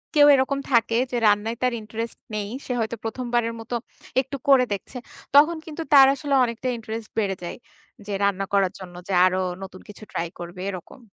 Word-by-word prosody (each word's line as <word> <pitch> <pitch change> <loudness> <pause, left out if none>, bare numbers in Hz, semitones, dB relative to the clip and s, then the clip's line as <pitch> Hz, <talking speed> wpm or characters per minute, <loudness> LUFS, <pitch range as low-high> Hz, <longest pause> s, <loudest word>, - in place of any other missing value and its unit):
কেউ 290 0 +7
এরকম 275 +1 +1
থাকে 230 -1 +3
যে - - -2
রান্নায় 210 +3 +2
তার 250 -1 +2
ইন্টারেস্ট 225 +2 -6 0.2
নেই, 205 -1 -2 0.2
সে - - -5
হয়তো 225 +1 -1
১ম 245 +3 -4
বারের 230 -1 +1
মত 225 +2 -11 0.5
একটু 270 +1 -7
করে 260 -2 +6
দেখছে। 200 +6 -7 0.4
তখন 310 +3 +6
কিন্তু 320 0 -6
তার 270 -1 +9
আসলে 285 0 -3
অনেকটা 235 +2 -3
ইন্টারেস্ট 225 -1 -6
বেড়ে 195 -3 0
যায়। 175 - -5 0.5
যে - - -4
রান্না 195 -1 +1
করার 195 -2 +3
জন্য 175 -2 -10
যে 195 - -2
আরো 185 0 +2 0.3
নতুন 185 -1 -10
কিছু 210 +1 -11
ট্রাই 170 - -2
করবে 175 +1 -8
এরকম। 185 +8 -10
225 Hz, 190 wpm, -24 LUFS, 200-255 Hz, 0.5 s, তার